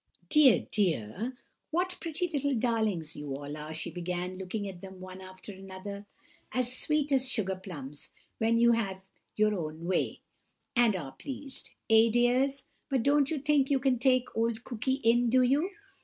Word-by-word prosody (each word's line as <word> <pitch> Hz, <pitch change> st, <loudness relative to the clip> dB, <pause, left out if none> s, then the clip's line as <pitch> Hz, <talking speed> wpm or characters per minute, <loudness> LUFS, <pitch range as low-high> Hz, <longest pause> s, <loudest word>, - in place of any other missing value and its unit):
"Dear, 290 Hz, -6 st, +6 dB
dear! 195 Hz, -, 0 dB, 0.3 s
what 360 Hz, +3 st, 0 dB
pretty 335 Hz, +2 st, -1 dB
little 285 Hz, -4 st, 0 dB
darlings 220 Hz, -9 st, 0 dB
you 145 Hz, -2 st, -5 dB
all 145 Hz, +1 st, -6 dB
are!" 155 Hz, +1 st, -7 dB
she 160 Hz, +2 st, -2 dB
began, 180 Hz, +1 st, -3 dB
looking 190 Hz, +2 st, -4 dB
at 185 Hz, -3 st, -8 dB
them 190 Hz, -1 st, -10 dB
one 185 Hz, 0 st, -9 dB
after 185 Hz, +2 st, -9 dB
another. 195 Hz, +1 st, -8 dB, 0.4 s
"As 255 Hz, 0 st, +1 dB
sweet 300 Hz, +1 st, 0 dB
as 265 Hz, -1 st, +3 dB
sugar 200 Hz, -6 st, 0 dB
plums, 150 Hz, -7 st, -8 dB, 0.3 s
when 225 Hz, +1 st, +3 dB
you 235 Hz, 0 st, +6 dB
have 195 Hz, -5 st, -1 dB, 0.3 s
your 215 Hz, 0 st, +3 dB
own 160 Hz, -3 st, -4 dB
way, 185 Hz, +1 st, 0 dB, 0.5 s
and 235 Hz, -4 st, +4 dB
are 140 Hz, -7 st, -5 dB
pleased. 270 Hz, -, -8 dB, 0.2 s
Eh, 225 Hz, +1 st, +6 dB
dears? 250 Hz, +4 st, +2 dB, 0.3 s
But 265 Hz, -5 st, +1 dB
you 290 Hz, +1 st, +5 dB
don't 275 Hz, -, +1 dB, 0.2 s
think 290 Hz, -3 st, +3 dB
you 280 Hz, -, +4 dB
can 255 Hz, -2 st, +2 dB
take 255 Hz, 0 st, +2 dB
old 225 Hz, 0 st, 0 dB
Cooky 250 Hz, +2 st, -1 dB
in, 235 Hz, +1 st, +4 dB
do 255 Hz, +2 st, +5 dB
you? 285 Hz, +8 st, +2 dB
225 Hz, 170 wpm, -30 LUFS, 185-260 Hz, 0.5 s, Dear